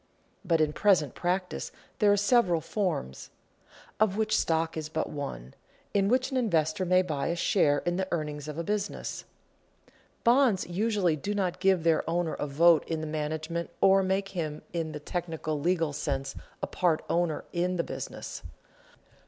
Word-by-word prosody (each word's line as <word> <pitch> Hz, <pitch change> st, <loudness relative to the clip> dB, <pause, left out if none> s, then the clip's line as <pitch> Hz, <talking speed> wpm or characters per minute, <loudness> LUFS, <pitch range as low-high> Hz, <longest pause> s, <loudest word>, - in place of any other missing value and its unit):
But 170 Hz, -4 st, +2 dB
in 150 Hz, -1 st, +2 dB
present 170 Hz, -8 st, +3 dB
practice 180 Hz, +1 st, -2 dB, 0.3 s
there 205 Hz, -1 st, +5 dB
are 205 Hz, -, +4 dB
several 205 Hz, -5 st, +3 dB
forms 165 Hz, -, -3 dB, 0.7 s
(of 210 Hz, -2 st, +2 dB
which 215 Hz, 0 st, +1 dB
stock 165 Hz, -4 st, +1 dB
is 155 Hz, -1 st, -4 dB
but 160 Hz, 0 st, -2 dB
one) 65 Hz, -, -6 dB, 0.4 s
in 195 Hz, -1 st, +3 dB
which 255 Hz, +4 st, +2 dB
an 265 Hz, -, 0 dB
investor 170 Hz, -6 st, +1 dB
may 185 Hz, +1 st, +4 dB
buy 150 Hz, -6 st, -2 dB
a 170 Hz, -, 0 dB
share 150 Hz, -4 st, +2 dB
in 175 Hz, 0 st, 0 dB
the 190 Hz, 0 st, -1 dB
earnings 150 Hz, -3 st, -3 dB
of 150 Hz, 0 st, -6 dB
a 170 Hz, -, -2 dB
business. 205 Hz, +3 st, -3 dB, 1.0 s
Bonds 235 Hz, -5 st, +4 dB
usually 190 Hz, -2 st, +1 dB
do 200 Hz, +8 st, -3 dB
not 185 Hz, -3 st, -1 dB
give 190 Hz, -3 st, +3 dB
their 165 Hz, -1 st, +3 dB
owner 170 Hz, -1 st, 0 dB
a 145 Hz, -, -3 dB
vote 160 Hz, +3 st, +5 dB
in 165 Hz, -1 st, -2 dB
the -, -, -3 dB
management 155 Hz, +2 st, -3 dB
or 195 Hz, 0 st, +5 dB
make 190 Hz, +1 st, 0 dB
him 160 Hz, -6 st, -4 dB
in 165 Hz, -2 st, -2 dB
the 150 Hz, -, -6 dB
technical 160 Hz, -1 st, -3 dB
legal 165 Hz, -1 st, +1 dB
sense 135 Hz, -2 st, -2 dB, 0.3 s
a -, -, +3 dB
part 170 Hz, -4 st, 0 dB
owner 170 Hz, -3 st, 0 dB
in 180 Hz, +1 st, 0 dB
the 170 Hz, -, 0 dB
business. -, -, -6 dB
170 Hz, 170 wpm, -28 LUFS, 155-195 Hz, 1.0 s, there